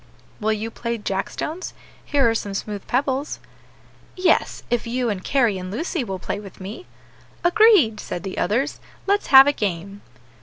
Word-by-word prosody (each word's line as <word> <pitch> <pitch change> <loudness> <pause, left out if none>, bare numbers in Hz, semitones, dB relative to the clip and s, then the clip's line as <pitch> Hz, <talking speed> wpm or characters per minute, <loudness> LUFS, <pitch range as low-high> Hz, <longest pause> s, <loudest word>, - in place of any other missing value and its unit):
"Will 220 0 +1
you 220 +2 -4
play 235 0 -3
jack 195 -2 -2
stones? 330 +4 -5 0.3
here 280 -4 +2
are 225 - +3
some 205 -3 -3
smooth 205 0 -5
pebbles." 270 +2 0 0.8
"Yes, 365 -2 +1
if 240 -1 0
you 240 -1 0
and 185 -2 -5
Carry, 235 -8 +2
and 185 0 -6
Lucy, 295 - -2
will 195 -4 -4
play 190 +2 -4
with 200 -2 -12
me." 205 - -8 0.6
"Agreed!" 350 - +5
said 175 - -5
the 190 -1 -4
others, 265 +8 0 0.3
"let's 405 +1 +1
have 270 0 +10
a 285 - +3
game." 200 -2 -3
230 Hz, 165 wpm, -22 LUFS, 200-285 Hz, 0.8 s, have